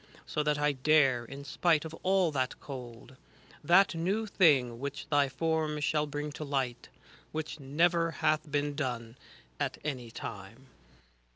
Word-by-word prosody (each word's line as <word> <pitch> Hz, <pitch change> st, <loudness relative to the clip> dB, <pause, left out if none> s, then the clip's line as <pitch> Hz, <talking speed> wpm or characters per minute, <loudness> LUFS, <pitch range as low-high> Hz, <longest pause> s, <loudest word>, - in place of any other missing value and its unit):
So 150 Hz, -, -1 dB
that 150 Hz, -1 st, +1 dB
r 145 Hz, 0 st, +2 dB
dare, 135 Hz, -3 st, +3 dB
in 140 Hz, +4 st, -9 dB
spite 160 Hz, +2 st, +2 dB
of 160 Hz, -, -7 dB
all 185 Hz, -3 st, +3 dB
that 130 Hz, -3 st, -2 dB
cold, 125 Hz, -1 st, -9 dB, 0.5 s
That 185 Hz, +6 st, +5 dB
new 190 Hz, +7 st, 0 dB
thing 140 Hz, -, +3 dB
which 140 Hz, +2 st, -5 dB
thy 145 Hz, -2 st, +4 dB
form 155 Hz, +1 st, -1 dB
shall 150 Hz, +1 st, +1 dB
bring 145 Hz, +1 st, -4 dB
to 150 Hz, -, -6 dB
light, 135 Hz, -4 st, -2 dB
^ -, -, -29 dB, 0.3 s
Which 155 Hz, 0 st, -4 dB
never 165 Hz, +5 st, +2 dB
hath 155 Hz, -1 st, 0 dB
been 145 Hz, 0 st, 0 dB
done 120 Hz, -5 st, -3 dB, 0.4 s
at -, -, -1 dB
any 130 Hz, -6 st, -4 dB
time. 115 Hz, +3 st, -9 dB
145 Hz, 155 wpm, -30 LUFS, 130-160 Hz, 0.5 s, That